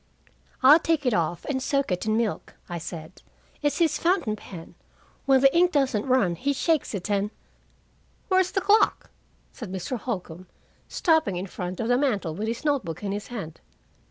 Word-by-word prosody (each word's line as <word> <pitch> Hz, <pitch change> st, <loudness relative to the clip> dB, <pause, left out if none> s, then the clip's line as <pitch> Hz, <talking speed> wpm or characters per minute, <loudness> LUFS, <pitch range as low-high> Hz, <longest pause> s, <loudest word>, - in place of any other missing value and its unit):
"I'll 290 Hz, +5 st, +9 dB
take 320 Hz, -3 st, 0 dB
it 250 Hz, -, +2 dB
off 170 Hz, -2 st, -1 dB
and 265 Hz, -2 st, -2 dB
soak 275 Hz, -4 st, 0 dB
it 180 Hz, +4 st, -2 dB
in 215 Hz, 0 st, +2 dB
milk," 230 Hz, -3 st, -2 dB
I 175 Hz, -1 st, -5 dB
said. 165 Hz, +1 st, -8 dB, 0.4 s
"It's 290 Hz, -1 st, 0 dB
his 320 Hz, -3 st, +2 dB
fountain 335 Hz, -, +1 dB
pen; 180 Hz, -5 st, -11 dB, 0.5 s
when 265 Hz, -1 st, +5 dB
the 275 Hz, +2 st, +5 dB
ink 355 Hz, +1 st, +4 dB
doesn't 270 Hz, -7 st, +1 dB
run, 250 Hz, -9 st, +3 dB
he 275 Hz, +12 st, -1 dB
shakes 310 Hz, -4 st, 0 dB
it, 185 Hz, -, -4 dB
and 200 Hz, 0 st, +1 dB, 0.5 s
" -, -, -38 dB
"Where's 375 Hz, -2 st, +3 dB
the 390 Hz, -, -1 dB
clock?" 415 Hz, +2 st, +3 dB, 0.4 s
said 225 Hz, -8 st, -8 dB
Mr. 190 Hz, +6 st, -4 dB
Holcombe, 185 Hz, -6 st, -5 dB, 0.4 s
stopping 320 Hz, -, +2 dB
in 180 Hz, +2 st, -3 dB
front 180 Hz, -1 st, -6 dB
of 230 Hz, -, -1 dB
the 245 Hz, +1 st, +3 dB
mantel 205 Hz, -, 0 dB
with 210 Hz, +7 st, -4 dB
his 230 Hz, +6 st, -4 dB
note 285 Hz, -3 st, +2 dB
book 165 Hz, +3 st, -7 dB
in 200 Hz, -, -2 dB
his 205 Hz, +1 st, -4 dB
hand. 195 Hz, -10 st, -7 dB
235 Hz, 185 wpm, -25 LUFS, 185-290 Hz, 0.5 s, I'll